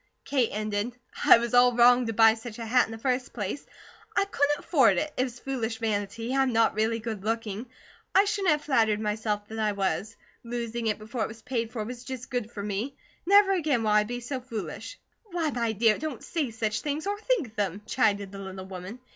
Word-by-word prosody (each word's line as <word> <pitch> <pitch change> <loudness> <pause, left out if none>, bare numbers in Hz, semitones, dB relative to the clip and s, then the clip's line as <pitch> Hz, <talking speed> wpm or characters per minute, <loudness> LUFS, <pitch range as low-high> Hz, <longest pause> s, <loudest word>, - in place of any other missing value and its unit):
Kate 260 -5 +1
ended: 215 +3 -2 0.3
"I - - +9
was 235 0 -3
all 245 0 +6
wrong 245 0 +6
to 225 - -2
buy 225 0 +7
such 225 0 -8
a 230 - -5
hat 245 +2 +3
in - - -10
the 225 - -6
first 255 +2 -1
place. 210 +5 -4 0.5
I 395 - +4
couldn't 295 -6 +1
afford 250 - +3
it; 305 +7 -1
it 255 - +1
was 245 -2 -6
foolish 240 -4 -3
vanity. 225 +3 -2
I'm 270 -1 +3
not 225 -1 +3
really 220 +2 +1
good 220 -3 -5
looking; 225 +1 -2 0.5
I 390 +2 +7
shouldn't 405 -3 0
have 300 -1 +2
flattered 220 -7 +2
myself 210 -1 -2
that 220 0 -6
I 215 -1 +1
was. 200 +2 -2 0.3
Losing 235 -1 -3
it 215 - +1
before 220 +3 -5
it - - -1
was 220 0 -12
paid 230 -3 -2
for 225 -3 -3
was 245 +1 -7
just 260 -1 -7
good 245 -3 -2
for 205 -4 -6
me. 210 +7 -3 0.3
Never 400 0 +6
again 300 -10 +1
will 215 - +1
I 210 0 +5
be 245 +3 -5
so 255 +2 -4
foolish." 245 - -6 0.3
"Why, 340 -6 -1
my 235 -3 0
dear, 220 0 +3
don't 305 -6 -5
say 305 -6 -2
such 220 -1 -2
things 300 +2 -3
or 410 +1 -2
think 425 - 0
them," 205 -2 -2
chided 205 -5 +1
the 200 - -8
little 190 -1 -7
woman. 190 +4 -8
230 Hz, 215 wpm, -27 LUFS, 215-260 Hz, 0.5 s, I